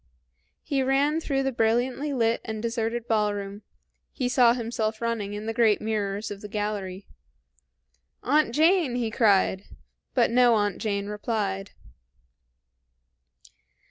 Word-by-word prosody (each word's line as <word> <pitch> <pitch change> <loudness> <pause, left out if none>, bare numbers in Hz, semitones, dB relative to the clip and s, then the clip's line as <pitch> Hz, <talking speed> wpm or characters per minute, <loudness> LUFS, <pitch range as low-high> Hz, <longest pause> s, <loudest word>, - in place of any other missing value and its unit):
He 275 -2 0
ran 280 +4 +1
through 270 -3 -1
the 270 - 0
brilliantly 245 +5 0
lit 230 -3 +1
and 220 -1 -5
deserted 230 +1 -2
ballroom; 205 -2 -1 0.5
he 255 - -2
saw 245 -2 +5
himself 225 -2 -2
running 230 -3 -2
in 210 +1 -6
the 225 - -2
great 225 -3 +3
mirrors 210 -1 -2
of 200 -1 -7
the 210 - -7
gallery. 205 -2 -4 1.2
"Aunt 295 0 +2
Jane!" 315 -1 +3
he 235 -3 -1
cried; 200 -4 +2 0.5
but - - +3
no 245 -1 +5
Aunt 205 -3 0
Jane 200 -2 -2
replied. 205 -2 -3
225 Hz, 125 wpm, -26 LUFS, 205-245 Hz, 1.2 s, saw